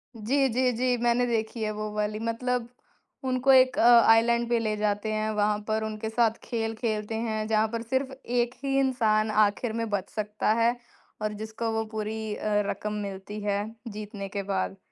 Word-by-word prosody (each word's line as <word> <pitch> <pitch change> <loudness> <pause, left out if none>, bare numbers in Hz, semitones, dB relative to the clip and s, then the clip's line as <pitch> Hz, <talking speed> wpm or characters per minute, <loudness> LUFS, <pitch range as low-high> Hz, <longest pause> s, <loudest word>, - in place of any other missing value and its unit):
जी, 265 +6 +1
जी, 250 +2 +2
जी 250 +2 +1
मैंने 240 +1 +2
देखी 225 -1 -2
है 215 - -1
वो 215 0 -4
वाली 210 0 -1
मतलब 235 +1 -2 0.6
उनको 255 +1 +3
एक 255 -1 +5
अ, - - +4 0.3
आइलैंड 235 +1 +4
पे 240 -1 +2
ले 215 -2 -1
जाते 210 +1 -1
हैं, 215 0 -1
वहाँ 210 0 +1
पर 220 0 0
उनके 220 0 -4
साथ 225 -1 +2
खेल 225 -1 -2
खेलते 220 -1 -2
हैं, 220 -1 -2
जहाँ 220 0 +2
पर 230 -1 -2
सिर्फ 260 +3 -1
एक 240 0 0
ही 270 0 +1
इंसान 220 -5 +2
आखिर 215 +2 +2
में 230 0 -2
बच 200 -3 -2
सकता 210 0 -1
है 235 +1 +3 0.5
और 215 0 -1
जिसको 220 +1 -3
वो 225 0 0
पूरी 220 0 -3
अ, 210 -1 0
रकम 210 0 -3
मिलती 200 +1 -6
है 205 0 0 0.2
जीतने 210 -2 -6
के 200 0 -3
बाद। 195 0 -2
220 Hz, 185 wpm, -27 LUFS, 210-235 Hz, 0.6 s, एक